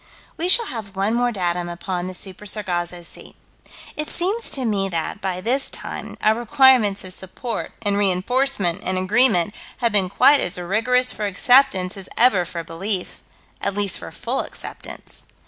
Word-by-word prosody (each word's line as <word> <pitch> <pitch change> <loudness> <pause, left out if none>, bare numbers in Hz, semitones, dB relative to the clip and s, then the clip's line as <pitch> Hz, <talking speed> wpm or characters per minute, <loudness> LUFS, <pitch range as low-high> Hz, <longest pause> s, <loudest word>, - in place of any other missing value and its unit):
We 345 +3 -1
shall 465 +5 +7
have 215 - -7
one 195 +3 0
more 245 0 +1
datum 175 -4 -2
upon 175 +1 -4
the 185 - -5
Super 195 +3 -5
Sargasso 175 -4 -2
Sea. - - -7 0.6
It 305 0 -3
seems 400 +7 -1
to 265 -2 0
me 200 -3 0
that, 170 +4 -4
by 185 -1 -3
this 255 +7 0
time, - - -7
our 215 - +5
requirements 240 -5 +4
of 185 -1 -7
support 190 +6 -6
and 205 -1 +1
reinforcement 200 0 +1
and 185 0 -1
agreement 205 -1 +3 0.2
have 235 -2 0
been 195 -3 +3
quite 275 +8 +5
as 180 -4 0
rigorous 230 +8 +1
for 210 - -3
acceptance 200 -2 +3
as 190 -1 -8
ever 215 -7 +4
for 170 -1 -5
belief: 180 +4 -3 0.4
at 200 - -1
least 205 -3 -1
for 85 - -9
full - - -3
acceptance. - - -8
200 Hz, 165 wpm, -21 LUFS, 185-245 Hz, 0.6 s, shall